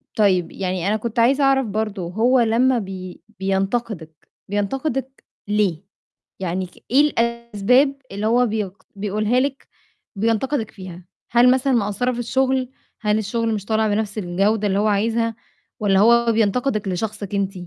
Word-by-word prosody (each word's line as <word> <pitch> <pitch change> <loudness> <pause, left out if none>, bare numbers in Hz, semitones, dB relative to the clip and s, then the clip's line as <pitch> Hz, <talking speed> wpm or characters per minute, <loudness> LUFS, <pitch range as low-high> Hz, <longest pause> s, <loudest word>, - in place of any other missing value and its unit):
طيب 190 -5 +2
يعني 185 -1 -2
أنا 215 - +2
كنت 230 +1 -3
عايزة 270 +5 +4
أعرف 270 -1 +3
برضه، 210 -1 -2
هو 240 +7 +3
لمّا 240 +2 +3
بي 185 -3 -7 0.2
بينتقدِك، 195 -4 -2 0.2
بينتقدِك 265 +6 -2 0.2
ليه؟ 205 -5 0 0.6
يعني 185 0 -2
ك 180 - -18
إيه 270 +3 +6
الأسباب 235 0 +2 0.2
اللي 205 +2 -2
هو 245 +2 +3
بيقد 210 -3 -4
بيقولها 210 +4 0
لِك 275 +1 -2 0.5
بينتقدِك 225 +3 0
فيها، 185 -2 -10 0.3
هل 245 +2 +6
مثلًا 260 +1 +2
مقصّرة 220 +2 0
في 245 - -5
الشُغل، 260 +1 0 0.3
هل 210 0 +2
الشُغل 225 +2 -1
مش 205 -2 -4
طالع 220 0 +1
بنَفْس 210 0 -1
الجودة 205 +3 +1
اللي 195 +1 +1
هو 215 - +2
عايزها؟ 225 +2 +1 0.4
والَّا 195 -2 +3
هو 235 +2 +5
بينتقدِك 220 0 0
لشخصِك 205 +1 -3
أنتِ؟ 195 -1 -1
215 Hz, 145 wpm, -21 LUFS, 195-240 Hz, 0.6 s, إيه